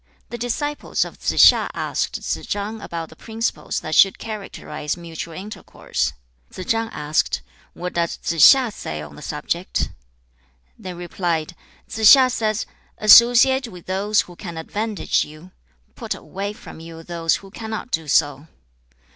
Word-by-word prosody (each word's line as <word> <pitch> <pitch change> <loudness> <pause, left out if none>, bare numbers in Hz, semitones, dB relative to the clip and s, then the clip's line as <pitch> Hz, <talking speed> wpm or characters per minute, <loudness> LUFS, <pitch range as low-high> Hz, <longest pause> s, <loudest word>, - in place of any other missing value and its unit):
The 240 - -4
disciples 290 +5 -2
of - - -11
Tsze - - -2
hsia - - +7
asked - - -2
Tsze - - -4
chang 210 +2 -3
about 165 -4 -6
the - - -15
principles 225 +5 -3
that 155 - -5
should 195 +3 +5
characterize 205 -7 -6
mutual 165 -1 -7
intercourse. 205 +4 -4 0.4
Tsze 185 - -7
chang 225 0 0
asked, 150 - -1 0.3
'What 180 +1 -5
does 170 -1 -1
Tsze 165 0 -3
hsia 255 - +7
say 75 - -6
on 75 -1 -11
the - - -12
subject?' - - -3 0.8
They 185 -1 -8
replied, 175 -2 -3 0.3
'Tsze 220 0 -2
hsia 260 -2 +3
says: 215 -2 -1 0.3
"Associate 245 +4 +7
with 180 -5 -12
those 200 +3 +1
who 175 - -12
can 170 -2 -8
advantage 210 +5 -1
you. 155 +5 -13 0.4
Put - - -4
away 200 +2 -6
from 210 - -12
you 165 0 -10
those 165 -1 0
who 195 -1 -10
cannot 220 +3 -6
do 160 -1 -2
so."' 145 0 +1
185 Hz, 150 wpm, -21 LUFS, 165-220 Hz, 0.8 s, hsia